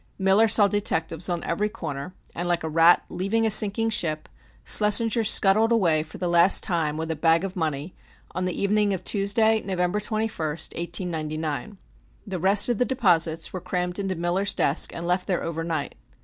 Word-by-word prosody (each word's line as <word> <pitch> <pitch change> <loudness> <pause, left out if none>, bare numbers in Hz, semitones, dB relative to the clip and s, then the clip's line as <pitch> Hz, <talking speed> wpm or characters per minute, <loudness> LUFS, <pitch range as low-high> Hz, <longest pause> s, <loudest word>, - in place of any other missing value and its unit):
Miller 195 +3 +3
saw 210 -1 +4
detectives 170 -4 0
on 175 -1 -3
every 205 +5 -2
corner, 155 -2 -7 0.2
and, 175 +1 -4
like 175 -1 -1
a - - -3
rat 165 +2 +4
leaving 200 +5 -2
a 220 - +1
sinking 215 +2 +4
ship, 155 -7 -1 0.4
Schlessinger 220 +2 +3
scuttled 215 +1 +3
away 170 -9 +2
for 155 - -11
the 180 - -3
last 175 +2 +4
time 160 -4 -2
with 160 0 -4
a - - -3
bag 165 +2 +2
of 195 0 -5
money 160 -1 -4 0.4
on 185 +1 -4
the 180 - -4
evening 205 0 +1
of 185 - -9
Tuesday, 220 +2 +1
November 180 +1 -2
21st, 210 -8 -3
1899. 160 - -4 0.5
The 190 -4 -5
rest 195 +4 +4
of 240 -4 -1
the - - +3
deposits 175 -11 0
were 185 - -5
crammed 180 +1 -2
into 195 -1 -3
Miller's 175 +4 -1
desk 140 - +1
and 170 - -7
left 180 +1 -1
there 180 -3 -2
over 165 0 -4
night. 160 -3 -4
180 Hz, 180 wpm, -24 LUFS, 165-205 Hz, 0.5 s, saw